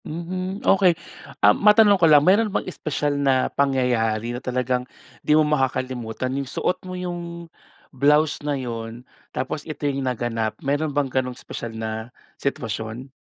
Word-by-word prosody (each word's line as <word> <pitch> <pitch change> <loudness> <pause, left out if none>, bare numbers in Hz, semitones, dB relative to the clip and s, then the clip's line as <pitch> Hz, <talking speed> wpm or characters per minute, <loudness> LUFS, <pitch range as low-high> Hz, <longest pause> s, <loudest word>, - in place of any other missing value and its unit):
Mhm, 185 +6 -5
okey. 185 -4 +4 0.5
Ah 105 - +8
matanong 210 - +5
ko 165 - +6
lang, 150 -1 +7
meron 210 +4 +4
bang - - -2
espesyal 150 -4 -2
na 135 -2 +2
pangyayari 120 -5 +1
na 120 - -5
talagang 125 -1 -1 0.4
di 150 - +3
mo 155 - +4
makakalimutan? 130 -4 -1
'Yung 135 -1 -3
suot 180 - -1
mo 185 - -5
'yung 175 -1 -5 0.5
blouse 150 +3 +3
na 145 -1 -1
'yun 115 -1 -6 0.2
tapos 130 +3 -3
ito 155 -1 -6
'yung 140 -1 0
naganap, 120 -4 -2
meron 145 +3 0
bang 145 0 0
gano'ng 130 -1 -2
espesyal 115 -1 -7
na 110 +1 -4 0.3
sitwasyon? 115 -1 -4
135 Hz, 150 wpm, -23 LUFS, 125-155 Hz, 0.5 s, Ah